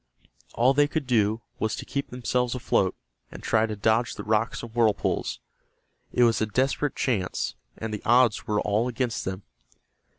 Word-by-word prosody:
All 125 +3 +4
they 145 +1 +4
could 155 -1 -2
do 110 -3 +2 0.2
was 110 -1 0
to - - -7
keep 140 0 -3
themselves 125 0 -1
afloat, 95 -6 +1 0.4
and - - -10
try 110 0 +2
to 110 - -4
dodge 110 +3 +1
the - - -6
rocks 110 +3 0
and 115 -2 -8
whirlpools. 115 -3 +1 0.7
It 125 - +3
was 115 -2 +3
a 110 - +1
desperate 135 +6 0
chance, 100 -8 -1 0.2
and 110 -1 -5
the 105 - -4
odds 120 -1 +3
were 105 -1 +1
all 105 +4 +1
against 125 -1 -2
them. 95 +1 -4
115 Hz, 170 wpm, -26 LUFS, 110-125 Hz, 0.7 s, All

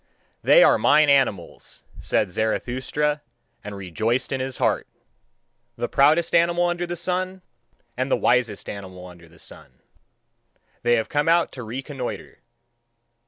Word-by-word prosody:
"They - - +6
are - - +5
mine 150 -1 +4
animals," 125 -11 -1 0.2
said 100 - 0
Zarathustra, 130 +8 -1 0.4
and 105 -1 -7
rejoiced 110 +7 -2
in 135 - -1
his 130 0 -4
heart. - - 0 0.9
"The - - -3
proudest 155 +4 +3
animal 170 +1 +3
under 175 0 -2
the 175 - -4
sun, 185 +2 -3 0.5
and 130 +2 -2
the - - +2
wisest 120 -4 0
animal 95 -2 -8
under 85 -2 -14
the 85 - -20
sun, 75 -3 -11 1.1
they 120 0 +3
have 110 -1 -1
come 145 +2 0
out 170 0 +3
to 130 - -9
reconnoitre. 130 +3 -6
130 Hz, 135 wpm, -23 LUFS, 105-155 Hz, 1.1 s, They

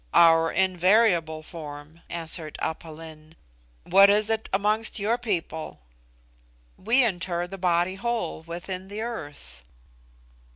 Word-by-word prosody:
"Our 165 -1 +6
invariable 180 -3 +2
form," 150 0 -10
answered 165 -2 -3
Aph 160 - -3
Lin. 160 0 -12 0.5
"What 195 +2 +6
is 210 +2 +3
it 220 0 -2
amongst 210 +3 0
your 225 +4 0
people?" 175 -8 -3 1.0
"We 240 +6 +3
inter 175 -5 -1
the 195 +2 -9
body 175 0 +1
whole 235 -3 -3
within 175 +3 -6
the 205 +2 -6
earth." 145 - -7
175 Hz, 115 wpm, -25 LUFS, 160-205 Hz, 1.0 s, Our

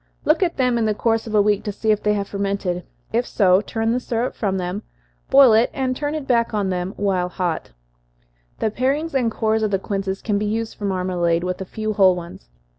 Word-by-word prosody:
Look 310 +4 +3
at 350 -3 +1
them 250 -3 +2
in 225 - +1
the 215 -1 +1
course 225 +1 0
of 215 - -3
a 205 - +5
week, 205 -1 +1
to 205 - -3
see 215 +2 0
if 210 - +1
they 210 0 +2
have 200 -1 -2
fermented 195 -3 -2 0.3
if 240 +2 +1
so, 190 -2 +4
turn 225 +1 -1
the 245 - +1
syrup 240 0 -2
from 195 -3 -1
them, 180 +2 -3 0.5
boil 270 -4 +7
it, 225 +2 +4
and 260 -2 -1
turn 290 +2 -2
it 305 -3 -4
back 235 -3 +1
while 190 -1 -1
hot. 180 -2 -3 0.9
The 220 - -1
parings 280 +8 -1
and 250 -4 +2
cores 220 0 0
of 215 - +1
the 195 - +1
quinces 195 0 -3
can 205 -2 0
be 210 - -1
used 225 +1 -2
for 205 - -6
marmalade, 180 -3 0
with 180 +1 -3
a - - -3
few 215 +3 -3
whole 190 -3 +5
ones. 170 - -9
210 Hz, 220 wpm, -21 LUFS, 190-230 Hz, 0.9 s, boil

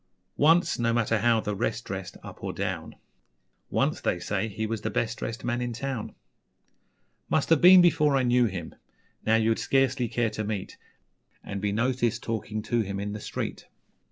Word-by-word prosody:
Once 165 +1 +4
no 115 0 +2
matter 115 -1 +1
how 115 +1 +3
the 105 -1 -3
rest - - -2
dressed - - -6
Up - - -11
or - - -3
down - - -4 0.7
Once, - - 0
they - - 0
say, 100 +4 -2
he 110 +1 -4
was 110 -1 -3
the - - -2
best 115 -1 -2
dressed 110 -1 -5
Man 120 0 -1
in 120 -1 -2
town. 130 -1 -4 1.1
Must 155 - +1
have 165 - +5
been 180 0 +9
before 155 -5 +4
I 130 - +2
knew 125 0 +3
him 95 -6 -5 0.5
Now 110 - +5
you'd 115 0 +2
scarcely 135 -2 +1
care 115 0 0
to 110 0 -4
meet 105 -3 -4 0.7
And 100 0 -5
be 105 0 0
noticed 120 +1 0
talking 110 -1 -3
to 120 +1 0
him 100 -2 -4
In 105 +1 -3
the 105 - -5
street. - - -5
115 Hz, 185 wpm, -27 LUFS, 105-125 Hz, 1.1 s, been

